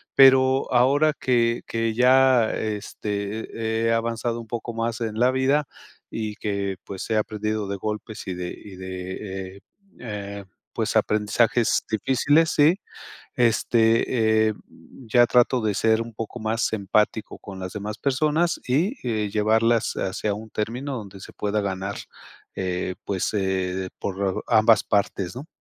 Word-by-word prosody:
pero 130 Hz, 0 st, +6 dB
ahora 140 Hz, +5 st, +4 dB
que 120 Hz, -2 st, +2 dB
que 115 Hz, -1 st, -1 dB
ya, 125 Hz, -1 st, +5 dB
este, 110 Hz, +1 st, -3 dB
he -, -, +2 dB
he -, -, +3 dB
avanzado 115 Hz, +1 st, -1 dB
un 115 Hz, -, -13 dB
poco 120 Hz, +1 st, -5 dB
más 115 Hz, 0 st, -2 dB
en 110 Hz, -1 st, -3 dB
la 125 Hz, +1 st, +5 dB
vida 135 Hz, +3 st, +1 dB, 0.4 s
y 110 Hz, -2 st, -4 dB
que, 100 Hz, -3 st, -2 dB
pues, 95 Hz, -2 st, -6 dB
he 110 Hz, -, +3 dB
aprendido 105 Hz, -1 st, -2 dB
de 100 Hz, -, -3 dB
golpes 105 Hz, +2 st, -5 dB
y 95 Hz, -, -2 dB
de 90 Hz, 0 st, -4 dB
y 100 Hz, -2 st, -11 dB
de, 95 Hz, +1 st, -6 dB
eh -, -, -17 dB, 0.4 s
eh, 100 Hz, -3 st, -6 dB, 0.3 s
pues, -, -, -2 dB
aprendizajes 110 Hz, +2 st, +2 dB
difíciles, 140 Hz, +8 st, +2 dB
¿sí? 160 Hz, +6 st, +4 dB, 0.6 s
Este, 115 Hz, -1 st, +3 dB
eh, -, -, -2 dB
mm, 120 Hz, +3 st, -17 dB
ya 120 Hz, 0 st, +6 dB
trato 125 Hz, +1 st, +3 dB
de 110 Hz, -1 st, 0 dB
ser 110 Hz, +2 st, +2 dB
un 115 Hz, 0 st, -11 dB
poco 115 Hz, +3 st, -6 dB
más 110 Hz, +1 st, 0 dB
empático 105 Hz, +1 st, 0 dB
con 100 Hz, -1 st, -9 dB
las 95 Hz, 0 st, -6 dB
demás 105 Hz, +1 st, -5 dB
personas 155 Hz, +5 st, +1 dB
y, 165 Hz, -, +1 dB
eh, 110 Hz, -3 st, -1 dB
llevarlas 110 Hz, +2 st, +2 dB
hacia 100 Hz, +2 st, -2 dB
un 110 Hz, +2 st, -9 dB
término 125 Hz, +6 st, -3 dB
donde 100 Hz, -3 st, -9 dB
se -, -, -11 dB
pueda 105 Hz, 0 st, -1 dB
ganar, 100 Hz, 0 st, -3 dB, 0.6 s
eh, 90 Hz, 0 st, -2 dB
pues, 95 Hz, 0 st, -1 dB
eh, -, -, +1 dB, 0.4 s
de 95 Hz, -1 st, -3 dB
por 95 Hz, -1 st, -2 dB
ambas 110 Hz, -1 st, +5 dB
partes, 100 Hz, -1 st, -1 dB
¿no? 135 Hz, +5 st, -7 dB
110 Hz, 150 wpm, -24 LUFS, 100-120 Hz, 0.6 s, pero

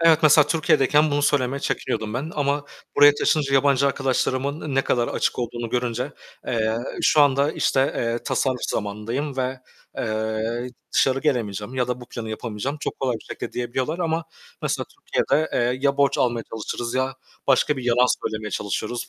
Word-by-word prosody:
Evet, 165 Hz, -2 st, +6 dB
mesela 150 Hz, -1 st, +7 dB
Türkiye'deyken 150 Hz, -1 st, +3 dB
bunu 145 Hz, 0 st, +1 dB
söylemeye 140 Hz, -1 st, +1 dB
çekiniyordum 110 Hz, -4 st, -2 dB
ben 145 Hz, +6 st, -3 dB
ama 145 Hz, 0 st, 0 dB, 0.3 s
buraya 145 Hz, 0 st, +8 dB
taşınınca 145 Hz, -2 st, +1 dB
yabancı 140 Hz, 0 st, +4 dB
arkadaşlarımın 135 Hz, +2 st, -1 dB
ne 135 Hz, -, +3 dB
kadar 120 Hz, -1 st, +1 dB
açık -, -, -1 dB
olduğunu 120 Hz, -1 st, -3 dB
görünce, 125 Hz, +2 st, -1 dB, 0.3 s
eee, 110 Hz, -2 st, 0 dB, 0.3 s
şu 155 Hz, -, +5 dB
anda, 140 Hz, +1 st, +4 dB
işte, 135 Hz, -, +1 dB, 0.2 s
eee, 115 Hz, 0 st, 0 dB
tasarruf 130 Hz, -2 st, 0 dB
zamanındayım 115 Hz, +7 st, -3 dB
ve, 130 Hz, 0 st, -2 dB, 0.4 s
eee, 110 Hz, +2 st, -2 dB, 0.2 s
dışarı 135 Hz, 0 st, +3 dB
gelemeyeceğim 115 Hz, -6 st, -1 dB
ya 125 Hz, -1 st, 0 dB
da 125 Hz, 0 st, -2 dB
bu 125 Hz, -, -10 dB
planı 110 Hz, -2 st, -6 dB
yapamayacağım 115 Hz, +5 st, -4 dB
çok -, -, -4 dB
kolay 130 Hz, -2 st, +1 dB
bir -, -, -16 dB
şekilde -, -, -6 dB
diyebiliyorlar 130 Hz, +7 st, -2 dB
ama 165 Hz, -1 st, -1 dB, 0.4 s
mesela -, -, -1 dB
Türkiye'de, 385 Hz, -, 0 dB
eee, 125 Hz, +1 st, +1 dB
ya 140 Hz, -1 st, +2 dB
borç 140 Hz, -1 st, +2 dB
almaya 120 Hz, -2 st, +1 dB
çalışırız 115 Hz, +2 st, -4 dB
ya 130 Hz, +1 st, 0 dB, 0.3 s
başka 140 Hz, +2 st, +3 dB
bir 125 Hz, -, -5 dB
yalan 125 Hz, +1 st, +4 dB
söylemeye 110 Hz, -3 st, -2 dB
çalışıyoruz 105 Hz, +5 st, -3 dB
130 Hz, 165 wpm, -23 LUFS, 120-145 Hz, 0.4 s, buraya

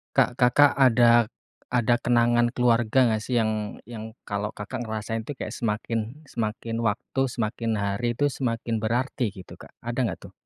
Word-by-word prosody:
Kak, -, -, +4 dB
Kakak 140 Hz, +4 st, +6 dB
ada 120 Hz, -3 st, +5 dB, 0.4 s
ada 120 Hz, -1 st, +3 dB
kenangan 120 Hz, 0 st, +3 dB
keluarga, 120 Hz, 0 st, +3 dB
enggak 110 Hz, -2 st, +1 dB
sih, 120 Hz, +2 st, -1 dB
yang 110 Hz, -2 st, -1 dB
yang 110 Hz, 0 st, -8 dB
kalau, 100 Hz, 0 st, -2 dB
Kakak 105 Hz, +2 st, -6 dB
ngerasain 110 Hz, 0 st, -3 dB
tuh 140 Hz, +4 st, -7 dB
kayak -, -, -5 dB
semakin 115 Hz, +5 st, -3 dB
semakin 115 Hz, -2 st, -3 dB
waktu, 115 Hz, +4 st, -1 dB
semakin 115 Hz, -1 st, -2 dB
hari 100 Hz, +4 st, -1 dB
tuh 145 Hz, -, +2 dB
semakin 115 Hz, -3 st, -2 dB
berarti, 120 Hz, +2 st, 0 dB
gitu. 95 Hz, -2 st, -12 dB
Kak, -, -, -13 dB, 0.2 s
ada 120 Hz, +2 st, -3 dB
enggak 110 Hz, -8 st, -1 dB
tuh? -, -, -12 dB
115 Hz, 160 wpm, -25 LUFS, 110-120 Hz, 0.4 s, Kakak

